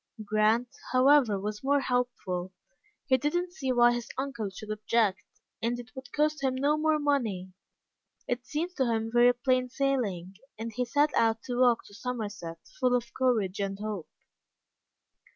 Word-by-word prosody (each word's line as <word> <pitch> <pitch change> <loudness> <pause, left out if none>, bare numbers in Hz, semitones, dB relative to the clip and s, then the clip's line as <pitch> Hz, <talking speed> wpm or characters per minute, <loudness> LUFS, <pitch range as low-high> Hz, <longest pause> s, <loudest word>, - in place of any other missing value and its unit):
Grant, 215 +3 +2 0.2
however, 255 -5 +5
was 210 +3 -5
more 285 +1 +3
hopeful. 240 -8 -2 0.5
He 260 -2 +4
didn't 350 +7 -1
see 270 -8 -2
why 240 -1 +5
his 240 -1 -4
uncle 250 -6 -3
should 210 +3 -8
object, 215 -2 +1 0.4
and 240 +1 -1
it 245 0 -10
would 260 -1 -9
cost 300 -1 0
him 260 -1 +1
no 285 +3 +2
more 310 0 +2
money. 230 -11 -1 0.7
It 245 -1 -2
seemed 325 +7 -3
to 265 - +2
him 225 0 -1
very 240 +1 +6
plain 255 0 +1
sailing, 225 -10 -1 0.2
and 225 +1 -5
he 250 +3 -1
set 290 +5 +2
out 225 -1 +2
to 245 -1 -3
walk 245 -2 +4
to - - -15
Somerset, 205 -7 -5 0.2
full 250 -1 +3
of 235 -1 -3
courage 220 -8 +1
and 195 -1 -2
hope. 210 -4 -5
245 Hz, 160 wpm, -29 LUFS, 215-265 Hz, 0.7 s, very